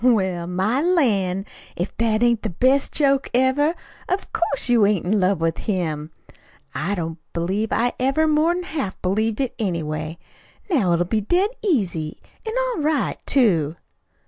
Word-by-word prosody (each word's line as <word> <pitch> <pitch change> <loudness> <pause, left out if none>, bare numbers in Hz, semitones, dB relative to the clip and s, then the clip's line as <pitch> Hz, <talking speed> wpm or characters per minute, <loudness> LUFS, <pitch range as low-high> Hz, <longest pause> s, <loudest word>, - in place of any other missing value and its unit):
"Well, 190 -8 +2
my 190 +9 0
lan', 205 - +1 0.3
if 175 +3 -4
that 225 0 +1
ain't 235 -2 +3
the - - -2
best 260 +10 +2
joke 275 -2 +2
ever! 270 +6 +3 0.3
Of 375 +2 -2
course, 285 -7 0
you 240 -3 +4
ain't 205 -4 0
in 205 +3 +2
love 190 -1 +2
with 165 0 -1
him! 160 -7 -2 0.6
I 175 +9 -1
don't 165 -2 -4
believe 190 +6 -1
I 245 +2 +1
ever 275 +5 +2
more 310 +1 +3
'n 355 +1 0
half 300 - -4
believed 215 +4 0
it, 260 -3 -1
anyway. 160 -5 -2 0.5
Now 205 - +3
it'll 175 +1 +2
be 215 +4 0
dead 360 - +1
easy, 190 - -1 0.3
an' 440 - -2 0.2
all 470 -10 -2
right, 300 -1 0
too." 170 - +3
215 Hz, 160 wpm, -22 LUFS, 175-275 Hz, 0.6 s, you